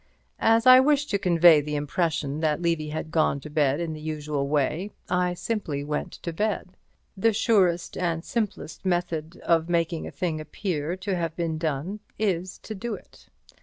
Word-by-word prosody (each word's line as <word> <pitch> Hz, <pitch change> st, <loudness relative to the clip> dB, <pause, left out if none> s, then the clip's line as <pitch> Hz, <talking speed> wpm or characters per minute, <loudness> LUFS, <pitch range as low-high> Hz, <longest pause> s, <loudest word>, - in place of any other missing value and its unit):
As 225 Hz, 0 st, +4 dB
I 255 Hz, 0 st, +10 dB
wished 290 Hz, +2 st, +2 dB
to 200 Hz, -, +1 dB
convey 170 Hz, -4 st, +6 dB
the 150 Hz, +1 st, -4 dB
impression 150 Hz, 0 st, -1 dB
that 155 Hz, -2 st, +1 dB
Levy 165 Hz, -3 st, 0 dB
had 155 Hz, +1 st, -5 dB
gone 155 Hz, -3 st, +2 dB
to 150 Hz, -, -9 dB
bed 145 Hz, -1 st, +2 dB
in 165 Hz, -2 st, -2 dB
the 155 Hz, -, -8 dB
usual 150 Hz, -2 st, -2 dB
way, 150 Hz, +6 st, 0 dB, 0.2 s
I 180 Hz, 0 st, +1 dB
simply 175 Hz, -7 st, -3 dB
went 150 Hz, +1 st, -3 dB
to 170 Hz, -, -3 dB
bed. 200 Hz, -1 st, -2 dB, 0.4 s
The 220 Hz, +3 st, +2 dB
surest 190 Hz, -6 st, +2 dB
and 170 Hz, -2 st, -1 dB
simplest 210 Hz, -8 st, -3 dB
method 175 Hz, -3 st, -1 dB
of 165 Hz, 0 st, +2 dB
making 170 Hz, -1 st, 0 dB
a -, -, -7 dB
thing 160 Hz, -4 st, -2 dB
appear 155 Hz, 0 st, -3 dB
to 190 Hz, +1 st, -2 dB
have 165 Hz, -2 st, -2 dB
been 165 Hz, -2 st, -2 dB
done 160 Hz, +6 st, -2 dB, 0.2 s
is 185 Hz, -3 st, -1 dB
to 220 Hz, -, -6 dB
do 220 Hz, +2 st, -4 dB
it. -, -, -17 dB
170 Hz, 175 wpm, -26 LUFS, 155-190 Hz, 0.4 s, I